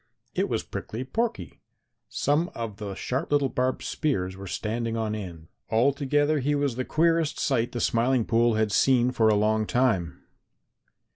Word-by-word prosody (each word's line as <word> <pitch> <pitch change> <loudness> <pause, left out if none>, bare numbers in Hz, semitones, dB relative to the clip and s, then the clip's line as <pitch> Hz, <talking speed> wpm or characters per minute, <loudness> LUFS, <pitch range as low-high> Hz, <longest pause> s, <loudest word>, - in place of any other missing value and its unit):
It - - 0
was - - -1
Prickly 115 +4 -6
Porky. 230 - -3 0.5
Some 150 +5 +1
of 115 -3 -5
the 100 -2 -6
sharp 130 +8 -3
little 145 -2 +3
barbed 130 +1 -1
spears 95 - -1
were 100 0 -9
standing 115 +4 -2
on 110 -1 -1
end; 85 -6 -7 0.2
altogether 140 +5 +2
he 145 +2 0
was 140 -4 0
the 130 - -2
queerest 165 +1 +1
sight 120 -4 0
the 120 - -4
Smiling 120 +1 +2
Pool 115 0 +2
had 110 -1 +1
seen 125 +3 +3
for 115 -3 +3
a 105 - +4
long 110 +1 +1
time. 110 -10 0
120 Hz, 160 wpm, -26 LUFS, 110-140 Hz, 0.5 s, a